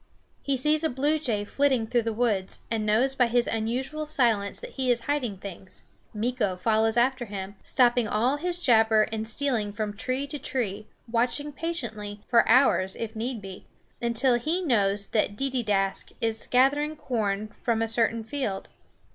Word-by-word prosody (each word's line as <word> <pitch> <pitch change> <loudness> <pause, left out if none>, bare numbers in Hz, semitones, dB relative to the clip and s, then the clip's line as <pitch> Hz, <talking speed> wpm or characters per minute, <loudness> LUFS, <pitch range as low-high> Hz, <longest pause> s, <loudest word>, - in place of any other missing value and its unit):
He 275 -1 0
sees 300 +4 +2
a 320 - +2
blue 290 +4 +1
jay 220 -8 -1
flitting 265 -1 +1
through 240 +2 +1
the 225 0 -2
woods, 215 -4 -1
and 220 -2 -1
knows 240 +6 +3
by 250 -2 +3
his 240 +1 +2
unusual 255 +7 -2
silence 235 -9 +1
that - - -9
he 260 -2 -2
is 240 -1 +3
hiding 250 -7 -2
things. 190 -1 -10 0.3
Meeko 215 -3 -1
follows 220 +2 +2
after 255 +1 +2
him, 200 -1 -6
stopping 245 -3 +3
all 240 +7 +1
his 350 +3 -2
jabber 225 -7 +4
and 220 0 -3
stealing 230 -4 -1
from 210 0 -4
tree 255 +5 -2
to 285 +1 -6
tree, 215 -6 -3 0.2
watching 245 +6 0
patiently, 225 -10 -5
for 235 - +4
hours 225 -6 +4
it 225 0 -5
need 230 -1 -3
be, 190 -1 -9 0.3
until 240 +1 +2
he 330 +9 -1
knows 205 - +2
that 210 -2 +1
Deedeeaskh 210 -7 -1
is 225 -1 -2
gathering 285 +4 +3
corn 215 -6 -2
from 225 -2 +1
a - - -1
certain 230 0 +1
field. 220 -5 -4
235 Hz, 165 wpm, -26 LUFS, 215-265 Hz, 0.3 s, jabber